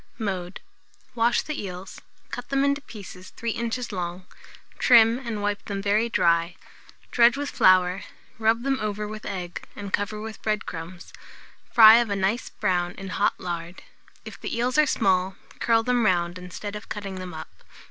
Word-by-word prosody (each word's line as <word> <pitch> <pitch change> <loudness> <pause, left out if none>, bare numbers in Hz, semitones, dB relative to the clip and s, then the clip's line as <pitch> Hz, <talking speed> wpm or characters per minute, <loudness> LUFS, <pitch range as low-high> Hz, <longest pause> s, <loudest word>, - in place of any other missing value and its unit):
Mode. 185 -4 -4 0.5
Wash 235 0 +2
the 305 - -4
eels, 185 -1 -8 0.3
cut 245 - -6
them 275 0 +2
into 280 +1 +1
pieces 195 -8 -11
3 235 0 -2
inches 235 +2 -3
long, 180 -1 -4 0.5
trim 230 -1 +6
and 230 -5 -5
wipe 205 0 -1
them 200 -1 -4
very 210 +3 +1
dry; 170 -4 +2 0.6
dredge 240 +2 +5
with 285 0 -3
flour, 185 0 +4 0.4
rub 225 +1 +2
them 270 0 0
over 210 0 -2
with 215 +1 -7
egg, 180 -3 -5
and 200 -1 -7
cover 205 +1 -1
with 220 0 -8
bread 215 -1 -1
crumbs; 170 +1 -8 0.6
fry 220 -1 +9
of 235 -2 0
a 200 - 0
nice 200 +5 -1
brown 180 -3 -1
in 195 -1 -8
hot 205 - 0
lard. 175 0 -6 0.4
If - - -10
the - - -4
eels 250 +4 +1
are 305 - +5
small, 190 -5 +1 0.2
curl 225 -1 +3
them 245 0 +1
round, 175 -3 +1
instead 190 +3 -7
of 210 - -9
cutting 195 -3 -5
them 180 -2 -7
up. 85 - -11
205 Hz, 170 wpm, -25 LUFS, 185-230 Hz, 0.6 s, fry